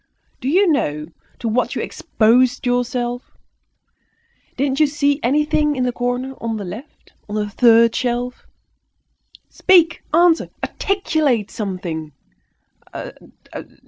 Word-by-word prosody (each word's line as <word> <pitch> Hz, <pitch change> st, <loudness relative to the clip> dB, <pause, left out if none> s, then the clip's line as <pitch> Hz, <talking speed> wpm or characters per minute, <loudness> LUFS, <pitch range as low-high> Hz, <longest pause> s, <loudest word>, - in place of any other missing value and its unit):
Do 260 Hz, -, -3 dB
you 380 Hz, +6 st, +4 dB
know 150 Hz, -, -1 dB, 0.3 s
to 235 Hz, -, -4 dB
what 235 Hz, +3 st, 0 dB
you -, -, -2 dB
exposed 245 Hz, +4 st, +2 dB
yourself? 245 Hz, 0 st, -2 dB, 1.2 s
Didn't 270 Hz, +1 st, 0 dB
you 305 Hz, -, +5 dB
see 285 Hz, 0 st, 0 dB
anything 300 Hz, +3 st, +1 dB
in 255 Hz, -, -1 dB
the 250 Hz, -, +1 dB
corner, 245 Hz, +2 st, -2 dB
on 225 Hz, -1 st, -2 dB
the 205 Hz, -, -5 dB
left, 220 Hz, +12 st, -11 dB, 0.2 s
on 210 Hz, -, -4 dB
the 210 Hz, -1 st, -1 dB
third 230 Hz, 0 st, +5 dB
shelf? 245 Hz, 0 st, -3 dB, 1.0 s
Speak, 340 Hz, -3 st, +3 dB
answer, 335 Hz, +1 st, +3 dB
articulate 310 Hz, -, 0 dB
something." 180 Hz, -7 st, -5 dB
245 Hz, 110 wpm, -20 LUFS, 225-295 Hz, 1.2 s, you